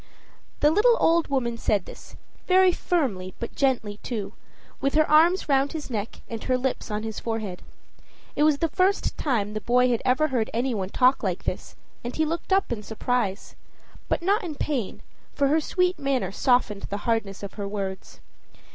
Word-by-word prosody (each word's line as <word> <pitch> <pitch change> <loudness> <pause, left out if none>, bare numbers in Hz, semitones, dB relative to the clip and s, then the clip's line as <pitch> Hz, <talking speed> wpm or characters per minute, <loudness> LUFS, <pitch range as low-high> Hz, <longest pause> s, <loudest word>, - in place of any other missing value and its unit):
The 295 - +5
little 465 +7 +4
old 335 0 +3
woman 240 -4 -1
said 200 -5 +1
this - - -12 0.3
very 370 0 +6
firmly, 235 - -1
but 235 - -5
gently, 240 -7 0
too 220 -5 -4 0.5
with 275 +1 0
her 310 0 +4
arms 335 +5 +4
round 275 0 +2
his 305 -4 -6
neck 215 -1 -4
and 225 -2 -6
her 255 - +2
lips 255 -1 -2
on 210 0 -3
his 220 -1 -4
forehead. 220 -5 -4 0.7
It - - -1
was 300 -1 +4
the 330 - +1
first 370 +5 +1
time 215 -7 -1
the 215 - -3
boy 250 +2 +3
had 235 -2 +1
ever 285 +5 +2
heard 235 -4 0
any 245 +2 0
one 190 -4 -3
talk 255 +5 +3
like 185 -4 -2
this, - - -4 0.3
and 240 - -5
he 315 - +1
looked 335 +4 -4
up 385 -5 +2
in 225 -3 -2
surprise 220 -2 -2 0.6
but - - 0
not 405 +5 +2
in 325 -4 -5
pain, 270 -9 -3 0.3
for 280 -1 +2
her 315 +2 +3
sweet 360 +1 0
manner 265 -9 0
softened 230 -3 +1
the 205 0 -5
hardness 210 -4 -1
of 200 - -6
her 200 -2 -5
words. 195 -2 -5
250 Hz, 185 wpm, -25 LUFS, 210-310 Hz, 0.7 s, very